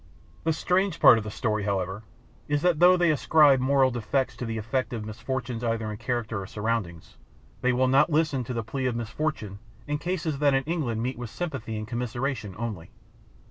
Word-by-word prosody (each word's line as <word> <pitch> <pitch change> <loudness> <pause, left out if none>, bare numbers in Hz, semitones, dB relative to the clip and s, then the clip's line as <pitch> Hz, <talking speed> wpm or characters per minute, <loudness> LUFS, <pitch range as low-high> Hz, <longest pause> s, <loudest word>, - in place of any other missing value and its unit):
The 165 - +3
strange 180 +3 0
part 115 - +8
of - - -6
the 105 - -5
story, 105 -1 -1
however, 95 0 -2 0.5
is 145 0 0
that 175 -4 +3
though 180 +1 +7
they 175 -2 +3
ascribe 150 -2 +5
moral 135 0 +3
defects 125 +3 -1
to 125 - -4
the 115 0 -3
effect 125 +4 -2
of 110 -2 -4
misfortune 125 +2 -4
either 115 -2 -1
in 105 - -6
character 115 -3 -2
or 95 - -7
surroundings, 105 -7 -3 0.4
they 125 - +3
will 130 +1 +2
not 140 +5 +4
listen 150 -4 +1
to 125 - -4
the 115 - -2
plea 130 +4 -2
of 125 - -1
misfortune 115 -3 -3 0.3
in 150 0 -2
cases 165 -4 -2
that 145 -2 +3
in 135 - +1
England 135 -9 -2
meet 125 0 -3
with 120 -2 -5
sympathy 135 -8 -4
and 110 0 -5
commiseration 120 -2 -3
only. 105 -7 -5
125 Hz, 195 wpm, -26 LUFS, 110-145 Hz, 0.5 s, part